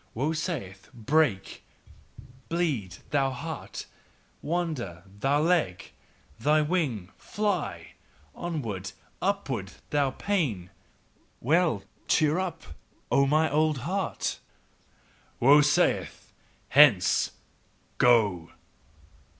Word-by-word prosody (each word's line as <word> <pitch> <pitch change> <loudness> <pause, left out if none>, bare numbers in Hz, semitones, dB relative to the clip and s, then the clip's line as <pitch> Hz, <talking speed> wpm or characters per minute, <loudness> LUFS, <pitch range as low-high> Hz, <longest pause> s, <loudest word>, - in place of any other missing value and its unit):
Woe 145 +7 0
saith: 145 - -5
"Break, 120 -3 0 0.9
bleed, 145 - -1 0.2
thou 140 -2 +2
heart! 160 +5 -6 0.6
Wander, 150 - -3 0.2
thou 140 +5 +2
leg! 150 - 0 0.5
Thou 150 +5 +3
wing, 140 - -1
fly! 180 - -3 0.4
Onward! 110 - -4 0.3
upward! 135 - -2 0.2
thou 145 -2 +2
pain!" 130 - -2 0.7
Well! 155 - +2 0.2
Cheer 155 +2 +3
up! 185 -3 -4 0.5
O 140 0 +4
mine 155 +1 +2
old 155 0 +2
heart: 190 +2 -2 1.0
WOE 140 +4 +7
SAITH: 145 0 0 0.4
"HENCE! 135 -10 +5 0.7
GO!" 105 -9 +3
145 Hz, 85 wpm, -27 LUFS, 105-165 Hz, 1.0 s, WOE